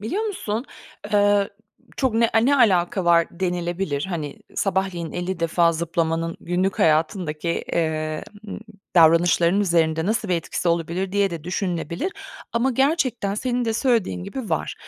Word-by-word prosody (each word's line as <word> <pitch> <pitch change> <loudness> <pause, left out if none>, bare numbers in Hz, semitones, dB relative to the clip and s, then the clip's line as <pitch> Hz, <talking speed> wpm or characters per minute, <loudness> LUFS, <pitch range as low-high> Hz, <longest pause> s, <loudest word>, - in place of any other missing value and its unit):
Biliyor 305 - -2
musun? 250 - -3 0.5
Eee, 205 -1 +3 0.5
çok 260 -5 0
ne 230 0 +3
eee, 225 +2 +4
"Ne 285 0 +4
alaka 185 -5 +3
var?" 170 -1 +4
denilebilir. 175 -4 -1
Hani, 155 -5 -4 0.2
sabahleyin 190 -4 -1
50 180 0 -3
defa 170 0 +3
zıplamanın 165 0 -1
günlük 185 +2 -1
hayatındaki, 160 0 +1 0.2
eee, 155 -2 -1 0.3
ımm, - - -6 0.3
davranışlarının 170 +3 +5
üzerinde 165 -3 +1
nasıl 220 -1 0
bir 180 - +2
etkisi 170 +1 -2
olabilir 170 +3 -1
diye 200 -2 +2
de 165 -2 -6
düşünülebilir 180 - -2 0.4
ama 240 +3 +1
gerçekten 255 -7 +1
senin 245 +2 -1
de 225 - 0
söylediğin 220 - 0
gibi 250 -8 -6
var. 160 - -1
180 Hz, 140 wpm, -23 LUFS, 165-215 Hz, 0.5 s, davranışlarının